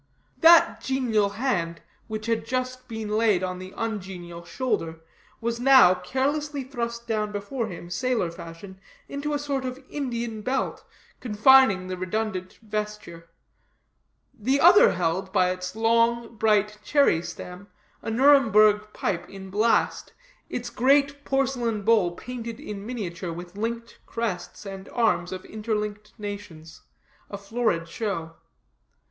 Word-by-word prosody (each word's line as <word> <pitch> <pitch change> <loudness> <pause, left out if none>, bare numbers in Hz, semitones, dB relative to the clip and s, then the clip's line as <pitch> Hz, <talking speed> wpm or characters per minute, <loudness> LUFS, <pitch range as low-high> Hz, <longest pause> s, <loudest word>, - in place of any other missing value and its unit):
That 335 +1 +6
genial 235 -6 +1
hand, 200 -7 -1 0.3
which 215 -1 -5
had 230 -1 0
just 255 0 -3
been 220 -2 -5
laid 210 -3 +2
on 185 0 -3
the 185 0 -9
ungenial 185 -6 -5
shoulder, 170 -4 -2 0.4
was 235 0 -2
now 255 -8 +7
carelessly 285 +6 -2
thrust 235 -3 -4
down 215 -2 -1
before 220 +4 -3
him, 175 -2 -9
sailor 225 -3 0
fashion, 170 +3 -11 0.3
into 290 +1 -3
a - - +2
sort 280 -2 -2
of 255 0 -4
Indian 235 -6 -3
belt, 260 +5 -2 0.4
confining 225 -3 +5
the 185 0 -5
redundant 185 -1 -3
vesture; 210 -6 -5 1.0
the 260 +6 0
other 355 +6 +7
held, 180 +2 -1
by 180 -1 +3
its 185 +1 -5
long 230 +1 +2
bright 210 -1 +2
cherry 280 - +3
stem, 180 +3 -9 0.3
a - - -5
Nuremburgh 215 -5 +5
pipe 185 -5 -2
in 190 -1 -10
blast, 215 +4 +1 0.4
its 240 -1 -4
great 280 +2 +2
porcelain 250 -6 0
bowl 200 -6 +3
painted 235 -1 -7
in 200 -1 -7
miniature 185 -7 -4
with 175 +2 -8
linked 230 +2 -4
crests 225 -3 -4
and 195 0 -8
arms 225 -7 +1
of 185 0 -6
interlinked 210 -1 -4
nations 200 -7 -8 0.5
a 200 - -5
florid 200 -5 -1
show. 165 -4 -4
215 Hz, 130 wpm, -25 LUFS, 185-245 Hz, 1.0 s, now